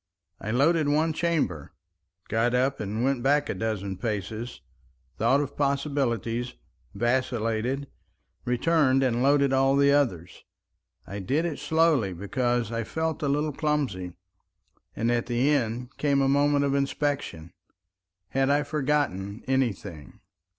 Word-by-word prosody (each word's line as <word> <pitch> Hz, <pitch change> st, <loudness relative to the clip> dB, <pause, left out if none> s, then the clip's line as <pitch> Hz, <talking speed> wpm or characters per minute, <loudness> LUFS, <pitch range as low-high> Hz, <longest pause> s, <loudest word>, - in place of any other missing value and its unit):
I 105 Hz, -, -6 dB
loaded 150 Hz, +6 st, +3 dB
one 155 Hz, +2 st, +2 dB
chamber, 150 Hz, -, -1 dB, 0.5 s
got 115 Hz, +2 st, +1 dB
up 130 Hz, +2 st, +1 dB
and 110 Hz, +2 st, -2 dB
went 135 Hz, -1 st, +1 dB
back 145 Hz, +3 st, +2 dB
a -, -, 0 dB
dozen 100 Hz, -4 st, -3 dB
paces, 110 Hz, +2 st, -4 dB, 0.6 s
thought 140 Hz, +2 st, +3 dB
of 140 Hz, -1 st, -5 dB
possibilities, 135 Hz, -5 st, -1 dB, 0.4 s
vacillated, 120 Hz, +1 st, 0 dB, 0.6 s
returned 135 Hz, +1 st, +2 dB
and 120 Hz, -2 st, +1 dB
loaded 140 Hz, 0 st, +3 dB
all 135 Hz, +1 st, +3 dB
the 140 Hz, 0 st, +4 dB
others. 115 Hz, -, 0 dB, 0.6 s
I 100 Hz, -, -6 dB
did 140 Hz, -, 0 dB
it 160 Hz, -5 st, -3 dB
slowly 145 Hz, -, +2 dB
because 120 Hz, +5 st, -1 dB
I 115 Hz, 0 st, -2 dB
felt 160 Hz, +7 st, -3 dB
a 145 Hz, -, 0 dB
little 150 Hz, +1 st, 0 dB
clumsy, 130 Hz, -, -1 dB, 0.8 s
and 115 Hz, +2 st, 0 dB
at 120 Hz, -1 st, 0 dB
the 125 Hz, +4 st, +2 dB
end 125 Hz, -2 st, -1 dB
came 140 Hz, -2 st, +2 dB
a -, -, +2 dB
moment 145 Hz, +1 st, +3 dB
of 140 Hz, -, 0 dB
inspection—had 95 Hz, -, -4 dB
I 145 Hz, +1 st, +3 dB
forgotten 140 Hz, -, -1 dB
any 130 Hz, -2 st, +2 dB
thing? 80 Hz, -7 st, -11 dB
130 Hz, 130 wpm, -26 LUFS, 110-145 Hz, 0.8 s, the